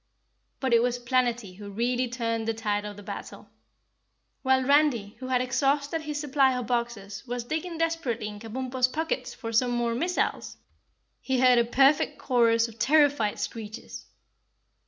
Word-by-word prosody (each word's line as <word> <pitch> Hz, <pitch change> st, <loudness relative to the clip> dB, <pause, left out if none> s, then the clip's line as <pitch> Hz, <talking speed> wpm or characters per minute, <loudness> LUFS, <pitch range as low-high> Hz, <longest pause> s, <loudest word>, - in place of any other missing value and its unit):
But 260 Hz, -3 st, 0 dB
it 230 Hz, -, +6 dB
was 245 Hz, 0 st, 0 dB
Planetty 240 Hz, -5 st, -1 dB
who 205 Hz, -1 st, -8 dB
really 245 Hz, +4 st, 0 dB
turned 230 Hz, -2 st, -2 dB
the 225 Hz, -, 0 dB
tide 210 Hz, -2 st, -1 dB
of 205 Hz, -1 st, -8 dB
battle. -, -, -8 dB, 0.9 s
While 260 Hz, -1 st, +3 dB
Randy, 280 Hz, -6 st, +3 dB
who 255 Hz, -, -6 dB
had 255 Hz, -1 st, +2 dB
exhausted 280 Hz, +4 st, 0 dB
his 300 Hz, -1 st, -4 dB
supply 270 Hz, -3 st, +2 dB
of 250 Hz, -, -3 dB
boxes, 220 Hz, -4 st, -3 dB
was 245 Hz, 0 st, -3 dB
digging 320 Hz, +6 st, -4 dB
desperately 325 Hz, -10 st, -1 dB
in 210 Hz, -1 st, -8 dB
Kabumpo's 255 Hz, +3 st, -1 dB
pockets 300 Hz, -2 st, -3 dB
for 230 Hz, 0 st, -6 dB
some 245 Hz, +2 st, +3 dB
more 240 Hz, -1 st, 0 dB
missiles, 345 Hz, +9 st, -1 dB, 0.6 s
he 260 Hz, -1 st, -1 dB
heard 250 Hz, -1 st, +6 dB
a 235 Hz, -, +3 dB
perfect 270 Hz, +4 st, +3 dB
chorus 230 Hz, -3 st, +3 dB
of 225 Hz, -1 st, -14 dB
terrified 285 Hz, -5 st, +3 dB
screeches. 215 Hz, -1 st, -7 dB
245 Hz, 155 wpm, -27 LUFS, 230-270 Hz, 0.9 s, it